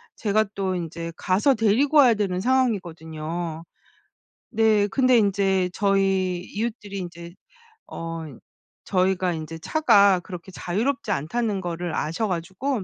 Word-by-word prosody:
제가 215 0 +1
또 190 -1 -1
인제 170 -1 -5
가서 200 +9 +2
데리고 230 +7 +2
와야 260 -5 +7
되는 195 -4 -1
상황이거든요. 170 -9 -2 0.9
네. 220 -2 +3
근데 255 +3 +3
인제 195 -3 +2
저희 195 -2 +1 0.2
이웃들이 215 -2 -4
인제 170 -1 -8 0.6
어 165 0 -5 0.6
저희가 185 -1 +1
인제 160 0 -6
차가 200 - +4
그렇게 180 +1 -9
자유롭지 225 +10 -2
않다는 200 +6 -1
거를 175 -1 -4
아셔 165 +8 -1
가지고 190 +7 -3
190 Hz, 270 characters per minute, -24 LUFS, 175-220 Hz, 0.9 s, 와야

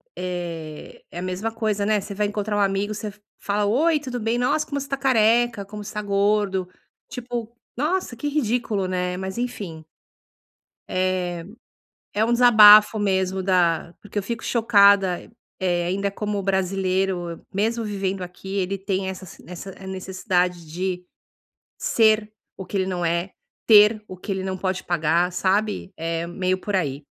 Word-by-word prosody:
eh, 170 -4 -6
é 175 - -6
a - - -4
mesma 185 +5 -3
coisa, 215 -3 -1
né, 210 -1 +2
você 200 - -7
vai 210 - +1
encontrar 205 0 -2
um - - +1
amigo, 195 +1 +1
você 210 0 -6 0.2
fala: 205 0 -1
Oi, 300 +9 +2
tudo 255 -4 -5
bem? 225 +2 0
Nossa, 300 +5 +1
como 280 0 -3
você 275 - -6
está 275 - -2
careca, 240 -4 +3
como 210 +1 -8
você 205 - -7
está 210 - -3
gordo", 200 -2 +1 0.4
tipo, 240 -2 -6 0.2
nossa, 305 -1 -1
que 290 - -4
ridículo, 235 -8 0
né, 180 0 -2
mas 190 +3 -5
enfim. 190 -10 -5 1.0
Eh, 185 0 +1 1.1
é 215 +1 +2
um 235 - +1
desabafo 215 -3 +8
mesmo, 190 -2 0
da 175 -2 +1
porque 205 0 -9
eu 200 - 0
fico 230 +2 -4
chocada, 200 -5 +4 0.3
eh, 175 -2 0
ainda, 200 +2 -1
como 210 0 -3
o 195 - -3
brasileiro, 190 -2 -1
mesmo 225 +4 0
vivendo 195 -2 -2
aqui, 190 +2 -6
ele 195 +1 -1
tem 190 0 -2
essa 190 0 -7 0.2
essa 180 +2 -8 0.2
necessidade 185 -2 -1
de 180 +3 -3 0.7
ser 220 -1 +2 0.3
o 190 - -7
que 200 - -3
ele 190 - +1
não 180 -2 -2
é, 170 +3 -1 0.3
ter 215 0 +6
o 185 - -9
que 195 - -6
ele 190 -1 -2
não 190 0 -3
pode 185 0 -2
pagar, 170 +1 +1
sabe, 200 +2 0
é 165 +1 -2
meio 185 +1 -1
por 205 +1 -3
aí. 145 -6 -1
195 Hz, 165 wpm, -23 LUFS, 185-215 Hz, 1.1 s, desabafo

